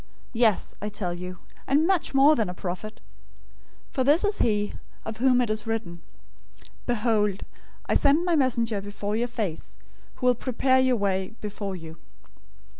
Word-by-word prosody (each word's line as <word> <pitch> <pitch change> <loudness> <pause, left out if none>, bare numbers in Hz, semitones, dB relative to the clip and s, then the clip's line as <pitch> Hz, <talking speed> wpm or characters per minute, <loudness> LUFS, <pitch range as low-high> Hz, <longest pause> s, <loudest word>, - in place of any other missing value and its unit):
Yes, 225 -3 +2
I 210 - -2
tell 180 -4 -3
you, 180 +1 -7 0.3
and 290 +4 +3
much 360 -6 +1
more 285 +3 +7
than 220 -8 0
a 180 - -6
prophet. 185 +4 -6 0.9
011:010 - - -33
For 260 - +1
this 295 +8 +4
is 410 0 +1
he, 210 -2 +1 0.3
of 220 0 -5
whom 250 +1 +4
it 235 -3 0
is 215 0 -2
written, 190 -7 -3 0.9
'Behold, 210 -4 +1 0.4
I - - 0
send 290 +5 +3
my 350 -2 +2
messenger 235 -7 +1
before 205 +1 -4
your 235 +2 0
face, 210 -9 -5 0.4
who 250 - -5
will 250 - +6
prepare 260 +2 +1
your 260 -1 +3
way 195 0 -1
before 200 -2 -5
you.' 160 -2 -10
220 Hz, 165 wpm, -26 LUFS, 200-260 Hz, 0.9 s, more